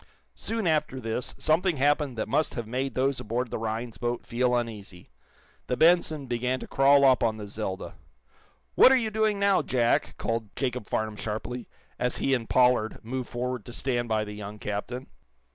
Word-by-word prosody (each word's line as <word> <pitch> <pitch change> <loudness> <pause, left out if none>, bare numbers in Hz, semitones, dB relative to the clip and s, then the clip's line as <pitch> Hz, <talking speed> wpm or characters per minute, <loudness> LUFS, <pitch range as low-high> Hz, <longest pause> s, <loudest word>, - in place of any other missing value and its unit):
Soon 225 -2 -3
after 150 -5 +1
this 115 +1 -3
something 165 +1 +2
happened 145 -2 +1
that 110 - -2
must 150 +7 +1
have 120 - -3
made 130 +3 -3
those 135 +1 +1
aboard 120 +3 -3
the - - -3
Rhinds 115 +1 -4
boat 120 0 -2
feel 125 +1 +1
uneasy. 105 -7 -5 0.6
The 125 - -1
"Benson" 160 -3 +3
began 125 +1 -1
to - - -7
crawl 140 +1 +5
up 130 -2 +5
on 110 -2 +1
the 105 -1 -7
"Zelda." 100 -2 -5 0.8
"What 260 - +8
are 265 - +6
you 225 -3 -1
doing 215 -1 +1
now, 200 -1 +3
Jack?" 120 -2 +1
called 115 -2 -3
Jacob 125 -5 -2
Farnum 110 -1 -2
sharply, 115 +4 -5 0.3
as 125 - 0
he 135 - +1
and 120 -4 -1
Pollard 125 -3 +3
moved 125 +2 -4
forward 125 -1 -3
to 120 - -9
stand 120 -2 -1
by 110 -1 +1
the 105 - -7
young 105 0 -7
captain. 105 +5 -4
125 Hz, 180 wpm, -27 LUFS, 110-135 Hz, 0.8 s, What